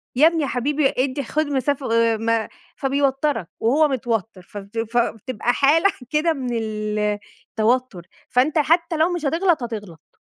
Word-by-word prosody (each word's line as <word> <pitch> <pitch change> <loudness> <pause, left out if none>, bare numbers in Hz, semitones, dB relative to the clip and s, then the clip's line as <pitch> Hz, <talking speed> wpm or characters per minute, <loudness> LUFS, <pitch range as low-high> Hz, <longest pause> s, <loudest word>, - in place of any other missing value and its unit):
يا 300 +5 +6
ابني 330 -1 +1
يا - - -1
حبيبي 275 +3 0
إدي 265 +2 0
خد 310 +6 -1
مسافة 280 -2 -1
آآ 230 -1 +3
م 225 0 0 0.3
فبيوترك 275 - 0
وهو 290 +7 +3
متوتر 225 -6 -2
فبت 200 +4 -10
فبتبقى 240 0 0
حالة 320 +9 +4 0.2
كده 310 +2 +2
من 260 -4 -4
التوتر، 215 0 -2 0.2
فأنت 270 +6 +2
حتى 335 +2 +2
لو 325 +3 +2
مش 345 -3 -3
هتغلط، 330 0 +1
هتغلط. 205 -9 -7
255 Hz, 140 wpm, -22 LUFS, 225-300 Hz, 0.3 s, يا